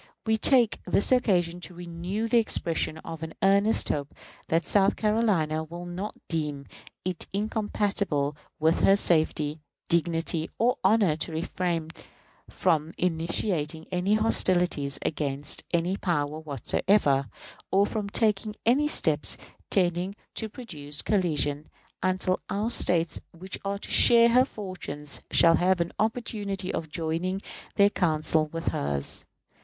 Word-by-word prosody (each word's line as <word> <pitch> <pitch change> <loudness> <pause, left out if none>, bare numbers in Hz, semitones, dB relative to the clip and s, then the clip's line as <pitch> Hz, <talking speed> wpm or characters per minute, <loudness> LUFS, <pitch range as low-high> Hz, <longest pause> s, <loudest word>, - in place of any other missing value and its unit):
We 220 0 +2
take 240 0 +3
this 200 - +3
occasion 180 -8 +2
to 180 - -8
renew 175 +5 -4
the 235 +1 +4
expression 165 -7 0
of 165 -1 -7
an 160 0 -7
earnest 200 +3 +3
hope 145 -1 -3 0.3
that 165 +1 +1
South 200 0 +3
Carolina 205 -8 +1
will 170 +2 -8
not 180 +4 -5
deem 150 -4 -2 0.4
it 185 -2 -2
incompatible 200 -8 -1 0.2
with 160 +1 +2
her 195 - +5
safety, 155 -4 +1 0.3
dignity; 165 -1 0
or 245 +3 +2
honor 205 -8 +4
to 165 - -3
refrain 165 0 -2 0.6
from 160 +1 0
initiating 165 -2 -1
any 185 +3 +1
hostilities 180 -9 +2
against 145 -2 -1
any 175 +2 +1
power 155 -5 -1
whatsoever, 145 -1 +1 0.4
or 195 +1 +3
from 210 -1 -3
taking 210 0 0
any 270 +6 +3
steps 155 - +1 0.3
tending 180 +1 +1 0.2
to 220 - -2
produce 155 - -3
collision, 150 -7 0 0.3
until 185 0 +1
our 215 +4 -1
States, 170 -7 +2 0.2
which 185 +2 -4
are 200 0 -2
to - - -7
share 235 0 +7
her 250 +2 +5
fortunes, 180 - -7
shall 165 -1 +5
have 185 0 +2
an 170 0 -1
opportunity 210 -4 -2
of 160 -1 -4
joining 165 +4 -2 0.4
their 200 0 +5
counsels 155 -3 +1
with 165 0 -2
hers. 70 0 -3
175 Hz, 130 wpm, -27 LUFS, 160-205 Hz, 0.6 s, share